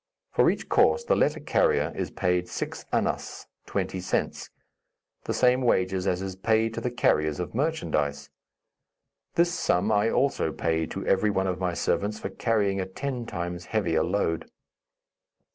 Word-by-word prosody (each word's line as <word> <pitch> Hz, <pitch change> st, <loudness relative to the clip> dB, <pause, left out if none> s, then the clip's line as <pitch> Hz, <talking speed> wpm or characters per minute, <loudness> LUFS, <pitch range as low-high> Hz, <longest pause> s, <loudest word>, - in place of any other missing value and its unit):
For -, -, +4 dB
each -, -, -2 dB
course 470 Hz, -, +4 dB
the -, -, +2 dB
letter -, -, +2 dB
carrier 465 Hz, -3 st, +1 dB
is -, -, -2 dB
paid 90 Hz, -1 st, 0 dB
six -, -, -5 dB
annas -, -, -1 dB, 0.2 s
(twenty 95 Hz, -, -2 dB
cents); 90 Hz, -, -2 dB, 0.8 s
the -, -, -1 dB
same 125 Hz, 0 st, +4 dB
wages 95 Hz, -5 st, +1 dB
as 90 Hz, 0 st, 0 dB
is 95 Hz, -1 st, -5 dB
paid 110 Hz, +3 st, +1 dB
to -, -, -4 dB
the 125 Hz, -, -1 dB
carriers 75 Hz, -11 st, +1 dB
of 90 Hz, -, -4 dB
merchandise. 75 Hz, -, -1 dB, 1.0 s
This 170 Hz, 0 st, +3 dB
sum 100 Hz, -, +1 dB
I 105 Hz, +1 st, +3 dB
also 135 Hz, -, +1 dB
paid 80 Hz, 0 st, -1 dB
to 95 Hz, -, -5 dB
every 95 Hz, +2 st, +3 dB
one 95 Hz, -2 st, 0 dB
of 90 Hz, -1 st, -2 dB
my 90 Hz, -2 st, -1 dB
servants 105 Hz, +4 st, 0 dB
for -, -, -5 dB
carrying 100 Hz, -4 st, +1 dB
a 90 Hz, -, -3 dB
ten 125 Hz, +4 st, -4 dB
times 90 Hz, -3 st, -4 dB
heavier 85 Hz, -8 st, +1 dB
load. 80 Hz, -5 st, -1 dB
95 Hz, 160 wpm, -27 LUFS, 90-115 Hz, 1.0 s, For